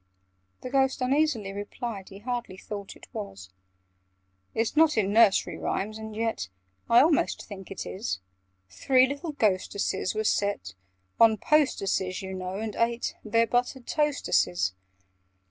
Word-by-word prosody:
(The 255 - -6
Ghost 265 -1 +2
uneasily 255 -6 +1
replied 205 0 -6
He 195 - -10
hardly 240 -3 -4
thought 200 0 -7
it - - -14
was). 95 -1 -7 1.0
"It's 225 +4 0
not 310 -4 +5
in 200 -2 +2
Nursery 220 -3 +4
Rhymes? 215 +3 -2
And 220 -1 -7
yet 225 - -2 0.4
I 235 +1 +8
almost 310 -3 +1
think 195 -2 -9
it 195 - -6
is— 190 - -3 0.5
'Three 255 - +3
little 285 +4 -4
Ghosteses' 200 -4 0
were 215 - 0
set 200 - 0 0.5
'On 225 -1 +6
posteses,' 195 -11 +1
you 190 0 -5
know, 185 0 -4
and 215 -1 -4
ate 235 +1 0
Their 230 +2 +3
'buttered 245 +2 -1
toasteses. 90 - +1
220 Hz, 135 wpm, -27 LUFS, 195-250 Hz, 1.0 s, I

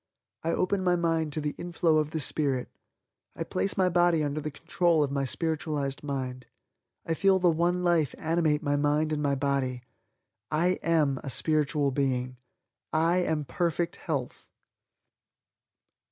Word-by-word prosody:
I 165 - -2
open 185 +3 0
my 180 -1 +3
mind 165 -2 0
to 155 - -2
the 150 0 -2
inflow 170 -2 +1
of 150 -1 -1
the 160 - -3
Spirit. 135 -3 0 0.7
I - - -3
place 195 - -1
my 185 -1 +3
body 175 -2 +3
under 145 +1 -2
the 150 - -3
control 165 +2 +1
of 140 - -2
my 140 -1 0
spiritualized 150 -2 -2
mind. 130 -3 -4 0.6
I 165 - 0
feel 195 +3 +3
the 180 -2 +3
One 175 +2 +1
Life 170 -5 +2
animate 160 -2 +1
my 145 -1 +1
mind 150 +2 +1
and 150 - -1
my 140 -1 +1
body. 135 -2 -1 0.7
I 175 +4 +1
AM 150 -5 +2
a 140 - -4
Spiritual 150 0 +1
Being. 130 -2 -1 0.5
I 165 +3 +2
AM 160 -4 0
Perfect 170 +1 -1
Health!" 140 -6 -4
155 Hz, 155 wpm, -28 LUFS, 140-170 Hz, 0.7 s, my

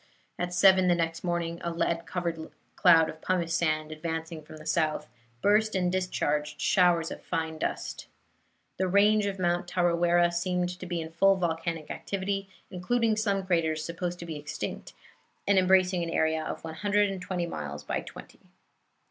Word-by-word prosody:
At 180 0 -2
seven 185 0 +5
the 175 - +4
next 165 0 -2
morning 170 -1 -2
a 170 - -1
lead 170 0 -1
covered 170 -3 -3 0.3
cloud 165 -3 +6
of 160 - -8
pumice 175 -3 0
sand, 155 -2 0
advancing 160 +1 -4
from 155 +1 -12
the 155 - -12
south, 155 -1 0 0.4
burst 215 +1 +3
and 180 -1 +1
discharged 150 -5 -1
showers 175 -3 +3
of - - -7
fine 160 -2 -3
dust. - - -4 0.7
The 190 - 0
range 205 +2 +4
of 195 -1 -3
Mount 175 -1 0
Tarawera 175 -1 +2
seemed 180 +1 -1
to 185 - -7
be 175 -1 -2
in 160 0 -7
full 195 +4 +4
volcanic 165 -3 -2
activity, 195 0 -3 0.2
including 220 +5 +1
some 200 -3 0
craters 160 -4 0
supposed 175 +1 -4
to 170 - -8
be 160 -2 -5
extinct, 145 0 -6 0.5
and 200 -1 +5
embracing 185 -1 +3
an 170 - -2
area 160 -1 +1
of - - -5
one 160 -1 -6
hundred 205 +3 +1
and 190 -1 -6
twenty 180 -1 -2
miles 75 - -6
by - - -2
twenty. - - -12
175 Hz, 170 wpm, -28 LUFS, 160-185 Hz, 0.7 s, cloud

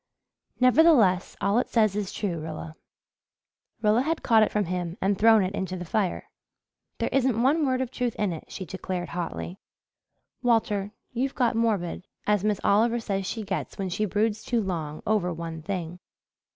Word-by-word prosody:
"Nevertheless, 255 - +5
all 200 +4 +3
it - - -2
says 215 -4 +3
is 205 -2 -2
true, 185 -6 -3
Rilla." 155 0 -7 1.1
Rilla 215 +3 +4
had 315 +4 -1
caught 225 -2 +5
it 215 - +3
from 210 -1 +1
him 175 0 -3
and 200 +1 +1
thrown 220 +1 +5
it 185 +1 -2
into 185 -2 -3
the 175 - -6
fire. 190 +2 -2 0.7
"There - - -1
isn't 260 -4 +2
one 290 +3 +3
word 260 0 +1
of 255 -2 -3
truth 245 -3 -2
in 205 -4 0
it," 160 - -8
she 190 - -6
declared 185 -1 -4
hotly. 175 +2 -5 0.8
"Walter, 210 -4 +1 0.2
you've 260 +3 -1
got 245 -3 +2
morbid 205 -6 -1 0.2
as 210 -2 +2
Miss 210 -2 +1
Oliver 230 +4 +3
says 195 -4 -2
she 220 +2 -3
gets 195 -2 -4
when 195 -1 -2
she 190 +4 -1
broods 210 +2 0
too 235 -3 0
long 160 -5 -4
over 200 -4 +1
one 165 -1 -6
thing." 180 -1 -4
205 Hz, 175 wpm, -26 LUFS, 180-230 Hz, 1.1 s, Nevertheless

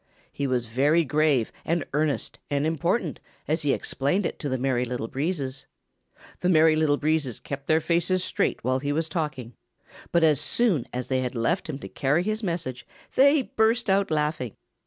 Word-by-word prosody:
He 140 - -2
was 125 -2 0
very 145 +8 +2
grave 150 -5 +2
and 170 +1 0
earnest 150 0 -1
and 145 0 0
important 165 +2 0 0.3
as 160 +2 0
he 145 -2 +1
explained 145 +9 0
it - - -3
to 145 - -3
the 130 - 0
Merry 130 -1 0
Little 125 -2 -3
Breezes. 135 -1 -3 0.7
The 180 - +1
Merry 160 -2 +5
Little 155 -2 +2
Breezes 150 -6 0
kept 140 -1 -7
their 160 0 +4
faces 175 +3 +1
straight - - -1
while 130 +2 +1
he 145 +1 -2
was 160 +2 0
talking, 140 -8 -4 0.6
but 170 -1 +3
as 150 -3 +4
soon, 185 - +1
as 125 0 -4
they 130 -1 0
had 125 0 -3
left 140 +10 0
him 145 - -3
to - - -8
carry 145 +6 +1
his 215 +2 -2
message 140 - -3 0.3
they 280 +1 +5
burst 225 -1 +1
out 195 +1 +2
laughing. 150 -6 -1
150 Hz, 180 wpm, -26 LUFS, 130-170 Hz, 0.7 s, Merry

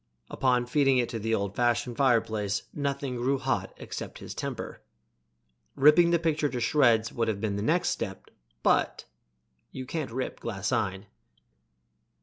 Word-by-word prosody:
Upon 125 -2 +1
feeding 135 +1 +3
it 120 -1 +1
to 115 - -4
the 115 +1 0
old 100 -1 -3
fashioned 120 0 +1
fireplace 110 -6 +1
nothing 140 -3 -2
grew 130 +3 +1
hot - - -2
except - - -7
his - - -8
temper. - - -5 0.9
Ripping 150 +5 +6
the 170 - +4
picture 155 -3 0
to 125 - -3
shreds 115 -4 +3
would 115 -1 0
have 105 -3 -1
been 105 -1 -2
the 100 - -2
next 165 +10 +2
step, - - -5 0.3
but - - +2 0.7
you 130 - -6
can't 155 -1 -3
rip 130 +3 -4
glaseine. 95 -2 -2
120 Hz, 145 wpm, -28 LUFS, 110-140 Hz, 0.9 s, Ripping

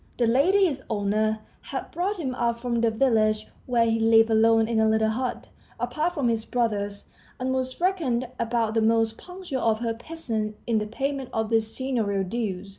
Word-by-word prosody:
The 240 - +2
lady, 325 +12 +4
his 280 -7 -1
owner, 215 +1 0 0.2
had - - -6
brought 390 +4 -1
him 270 -7 -3
up 235 -1 -1
from 235 -1 -1
the 230 - +3
village 220 -2 +2 0.2
where 240 -2 +3
he 225 0 +1
lived 225 0 +5
alone 225 0 +4
in 230 -1 +1
a 220 0 +4
little 220 0 +2
hut, 250 +3 -3 0.3
apart 305 +9 -1
from 280 -6 0
his 225 -1 0
brothers, 210 -5 -2 0.3
and 260 +1 -1
was 260 0 -2
reckoned 315 -10 0
about 230 -1 0
the 225 - +2
most 225 0 +2
punctual 360 -8 -6
of 225 -1 +2
her 230 -1 0
peasants 225 -5 -4
in 225 -2 +1
the 210 - -3
payment 270 +3 -3
of 220 0 -1
the 225 0 +4
seignorial 220 -4 -2
dues. 195 -2 -3
230 Hz, 190 wpm, -25 LUFS, 220-260 Hz, 0.3 s, lived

